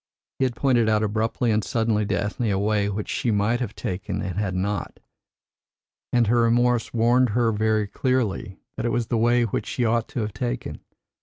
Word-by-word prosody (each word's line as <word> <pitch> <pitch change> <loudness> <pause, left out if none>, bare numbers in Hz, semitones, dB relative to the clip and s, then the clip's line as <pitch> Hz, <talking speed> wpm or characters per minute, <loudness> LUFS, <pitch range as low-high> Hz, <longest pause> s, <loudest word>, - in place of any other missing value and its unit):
He 135 - +3
had 125 -2 -2
pointed 120 -4 +2
out 110 0 +2
abruptly 110 +2 0
and 110 0 +1
suddenly 110 -3 0
to - - 0
Ethne 105 +5 -2
a 100 - +1
way 100 0 +1
which 105 +1 -4
she 135 -3 -1
might 110 +3 +1
have 120 -5 -4
taken 95 0 -4
and 95 -2 -4
had 100 -2 -2
not, 100 +2 -3 1.1
and 120 -1 +3
her 120 +2 +3
remorse 120 0 +2
warned 120 +2 +3
her 115 -2 +3
very 110 0 +1
clearly 115 -3 -1 0.2
that 115 - -2
it - - 0
was 115 -1 -1
the 120 - +1
way 120 +1 +3
which 115 - -2
she 125 - -1
ought 115 +1 +1
to 145 -4 -4
have 105 -1 -3
taken. 120 +3 -4
115 Hz, 200 wpm, -24 LUFS, 105-120 Hz, 1.1 s, He